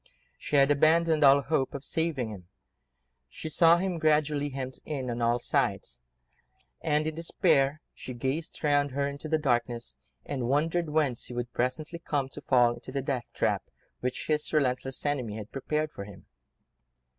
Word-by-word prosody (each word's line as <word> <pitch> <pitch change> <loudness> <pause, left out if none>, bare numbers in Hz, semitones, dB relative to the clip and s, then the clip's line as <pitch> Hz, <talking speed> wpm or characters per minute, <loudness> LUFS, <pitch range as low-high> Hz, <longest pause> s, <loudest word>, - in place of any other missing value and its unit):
She - - -3
had 140 0 +5
abandoned 155 +1 +4
all 140 0 +7
hope 140 -3 0
of 140 0 -6
saving 155 -9 -1
him: 90 -4 -10 0.8
she 160 - -6
saw 165 +2 +6
him 180 -1 -2
gradually 150 -2 +2
hemmed 130 -1 -5
in 135 -5 -3
on 120 0 -3
all 120 +1 +3
sides, - - -1 0.8
and, 150 +1 +1
in 155 - -1
despair, 150 -3 +2
she 130 - -8
gazed 135 +9 -3
round 145 -1 +3
her 140 +1 0
into 140 +2 -6
the 160 - +3
darkness, 120 - -1 0.3
and 130 -4 -3
wondered 160 +4 +1
whence 150 -6 0
he 125 - -8
would 120 0 -4
presently 155 +7 -2
come, 145 -5 -2
to - - -10
fall 120 -2 +4
into 120 +2 -10
the 135 0 -2
death 130 -3 -2
trap - - +1 0.4
which 125 0 -3
his 150 -1 0
relentless 135 -3 0
enemy 125 -7 -1
had 105 0 -8
prepared 150 +3 -2
for 100 - -7
him. 100 -2 -13
140 Hz, 170 wpm, -28 LUFS, 125-155 Hz, 0.8 s, all